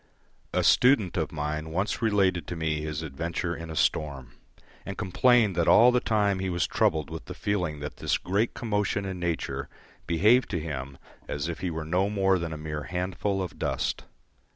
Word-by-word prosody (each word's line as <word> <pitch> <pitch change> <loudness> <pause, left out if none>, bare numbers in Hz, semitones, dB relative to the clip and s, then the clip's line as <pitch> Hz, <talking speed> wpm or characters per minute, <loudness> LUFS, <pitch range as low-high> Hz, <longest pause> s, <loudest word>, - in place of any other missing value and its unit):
A - - +1
student 120 -8 +4
of 80 -3 -1
mine 75 +1 -3
once 95 +6 -1
related 95 -7 +2
to 90 - -4
me 80 -2 -1
his 75 0 -4
adventure 85 +4 -3
in 85 0 -8
a 80 - -6
storm, 70 -5 0 0.5
and 100 - -6
complained 110 +1 +3
that 85 -1 +1
all 120 +2 +7
the 125 - +3
time 105 -4 +1
he 95 0 -2
was 85 -1 0
troubled 80 -1 +1
with 80 - -7
the - - -8
feeling 90 -8 -2
that 75 - -6
this - - 0
great 100 +5 -1
commotion 105 -3 -1
in 95 -2 -4
nature 75 -5 -2 0.4
behaved 105 +9 +4
to 90 - -1
him 70 -4 -5 0.3
as 75 +2 -3
if 85 - -4
he 90 - -2
were 80 -1 -4
no 90 +5 +1
more 95 -2 +2
than 85 -1 -4
a 80 - -5
mere 75 -1 -5
handful 95 +2 -2
of 90 - -8
dust. - - -2
85 Hz, 190 wpm, -27 LUFS, 80-100 Hz, 0.5 s, all